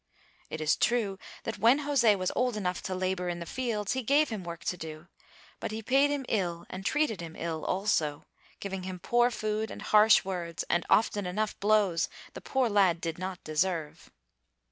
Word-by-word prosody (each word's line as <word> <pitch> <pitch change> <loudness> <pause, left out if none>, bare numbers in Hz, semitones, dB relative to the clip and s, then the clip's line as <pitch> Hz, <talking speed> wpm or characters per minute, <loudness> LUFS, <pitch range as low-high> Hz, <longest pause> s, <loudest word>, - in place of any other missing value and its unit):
It 155 - -5
is 155 0 +3
true 215 -5 +1 0.2
that 225 - -4
when 245 +6 +5
José 250 -8 +3
was 185 -1 -1
old 250 -3 +1
enough 180 -3 -2
to 185 - -3
labor 185 -1 -1
in 175 - -3
the 170 - -6
fields 220 -2 -2
he 260 - -1
gave 285 +5 +3
him 215 -5 -4
work 170 -1 -7
to - - -1
do, 160 0 -9 0.5
but - - -3
he 220 +1 -5
paid 270 +5 +4
him 285 -2 -2
ill 175 -5 -1
and 185 +1 -6
treated 230 - 0
him 165 -1 -8
ill 165 -1 -3
also, 165 -7 0 0.3
giving 195 -1 -4
him 185 0 -5
poor 240 +7 +2
food 215 -1 -2
and - - -8
harsh 215 -1 +6
words, 175 -3 -4
and 175 - +1
often 205 -3 +2
enough 210 +4 -2
blows 200 -5 +2 0.2
the - - -8
poor 265 -2 +1
lad 195 -6 +3
did 165 0 -4
not 185 -1 -5
deserve. 155 0 -2
195 Hz, 190 wpm, -29 LUFS, 175-225 Hz, 0.5 s, harsh